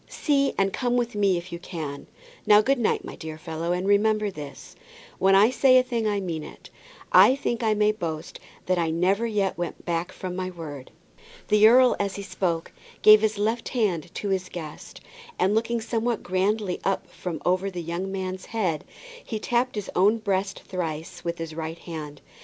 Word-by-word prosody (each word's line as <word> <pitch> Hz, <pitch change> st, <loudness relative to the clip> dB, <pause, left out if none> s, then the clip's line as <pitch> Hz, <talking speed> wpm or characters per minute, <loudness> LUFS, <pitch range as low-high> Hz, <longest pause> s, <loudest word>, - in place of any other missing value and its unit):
See 280 Hz, -2 st, +1 dB
and 195 Hz, 0 st, +1 dB
come 245 Hz, -1 st, 0 dB
with 240 Hz, 0 st, -1 dB
me 200 Hz, -3 st, +2 dB
if 175 Hz, +1 st, -7 dB
you 170 Hz, -, -5 dB
can. 155 Hz, -5 st, -6 dB, 0.4 s
Now, 210 Hz, 0 st, +8 dB
good 270 Hz, +3 st, +1 dB
night, 230 Hz, -, 0 dB
my -, -, -8 dB
dear 160 Hz, -1 st, -7 dB
fellow, 160 Hz, +2 st, -4 dB
and 180 Hz, +2 st, -1 dB
remember 210 Hz, 0 st, +3 dB
this, 145 Hz, -5 st, -10 dB, 0.4 s
when 195 Hz, 0 st, +5 dB
I 210 Hz, +5 st, +6 dB
say 255 Hz, 0 st, +5 dB
a 255 Hz, -, +5 dB
thing 235 Hz, -3 st, -1 dB
I 205 Hz, -1 st, 0 dB
mean 170 Hz, -5 st, -4 dB
it. -, -, -12 dB, 0.4 s
I 260 Hz, -, +7 dB
think 240 Hz, -4 st, -2 dB
I 220 Hz, -2 st, +2 dB
may 210 Hz, 0 st, +3 dB
boast 165 Hz, -6 st, -5 dB, 0.3 s
that 185 Hz, -1 st, +1 dB
I 165 Hz, -1 st, +1 dB
never 190 Hz, +7 st, +1 dB
yet 200 Hz, -5 st, -1 dB
went 175 Hz, -, -5 dB
back 170 Hz, +1 st, -2 dB
from 185 Hz, -1 st, -6 dB
my 185 Hz, 0 st, -3 dB
word." 150 Hz, -7 st, -8 dB, 0.6 s
The 210 Hz, +1 st, +7 dB
earl 250 Hz, +2 st, +6 dB
as 200 Hz, -1 st, -1 dB
he 200 Hz, -, -5 dB
spoke 170 Hz, -4 st, -2 dB, 0.3 s
gave 215 Hz, 0 st, +9 dB
his 215 Hz, -1 st, 0 dB
left 225 Hz, +3 st, -1 dB
hand 200 Hz, -, 0 dB
to 205 Hz, -, -3 dB
his 185 Hz, -1 st, -1 dB
guest, 155 Hz, -4 st, -9 dB, 0.4 s
and 190 Hz, +3 st, +2 dB
looking 230 Hz, +2 st, 0 dB
somewhat 230 Hz, +1 st, -2 dB
grandly 190 Hz, +1 st, 0 dB
up 195 Hz, -, 0 dB, 0.4 s
over 185 Hz, +2 st, +1 dB
the 180 Hz, -3 st, -6 dB
young 175 Hz, +4 st, -4 dB
man's 185 Hz, -1 st, -4 dB
head, 185 Hz, -9 st, -1 dB, 0.4 s
he 220 Hz, -, -4 dB
tapped 240 Hz, +3 st, 0 dB
his 210 Hz, -3 st, -4 dB
own 205 Hz, +5 st, +4 dB
breast 195 Hz, -2 st, -2 dB
thrice 165 Hz, -4 st, -5 dB
with 170 Hz, 0 st, -3 dB
his 165 Hz, -1 st, -6 dB
right 160 Hz, +1 st, -5 dB
hand. 150 Hz, -5 st, -8 dB
195 Hz, 190 wpm, -25 LUFS, 170-220 Hz, 0.6 s, gave